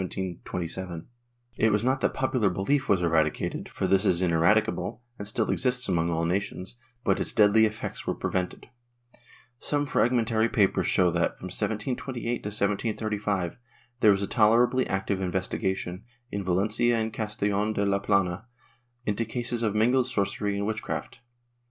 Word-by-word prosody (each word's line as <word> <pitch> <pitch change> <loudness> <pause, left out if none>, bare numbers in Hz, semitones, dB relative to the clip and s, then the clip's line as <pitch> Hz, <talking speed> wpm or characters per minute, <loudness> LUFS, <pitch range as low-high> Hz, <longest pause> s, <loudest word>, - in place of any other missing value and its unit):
^ 90 -1 -4 0.5
It 110 - +3
was 105 +1 +1
not 130 +2 +1
that - - 0
popular 125 -6 +1
belief 100 +10 0
was 95 -3 +3
eradicated, 80 -2 0
for - - -3
this 95 0 +3
is 90 -3 +2
ineradicable 85 +7 +1 0.2
and 105 - -5
still 110 +1 0
exists 125 -1 +1
among 85 -3 +1
all 85 0 0
nations, 95 +3 -2 0.3
but - - +2
its - - -1
deadly 110 0 +5
effects 110 0 -6
were - - 0
prevented. 90 -1 -3 0.9
Some 145 0 0
fragmentary 115 -4 +2
papers 95 -5 +2
show 90 -2 +3
that, 85 0 0
from 90 - -7
1728 120 +3 -2
to - - -5
1735, 105 -2 -1 0.4
there 110 - +5
was 100 0 +3
a - - -1
tolerably 120 +3 +3
active 95 0 -1
investigation, 95 0 -2 0.3
in 100 -1 -3
Valencia 105 +6 +2
and 110 0 -2
Castellon 105 -1 -1
de 100 -1 0
la 100 0 +2
Plana, 100 +1 0 0.6
into 105 +2 0
cases 120 +1 -3
of 110 -3 0
mingled 125 +4 +3
sorcery 100 -3 -1
and 100 - -1
witchcraft. 110 +1 -4
105 Hz, 150 wpm, -27 LUFS, 95-115 Hz, 0.9 s, deadly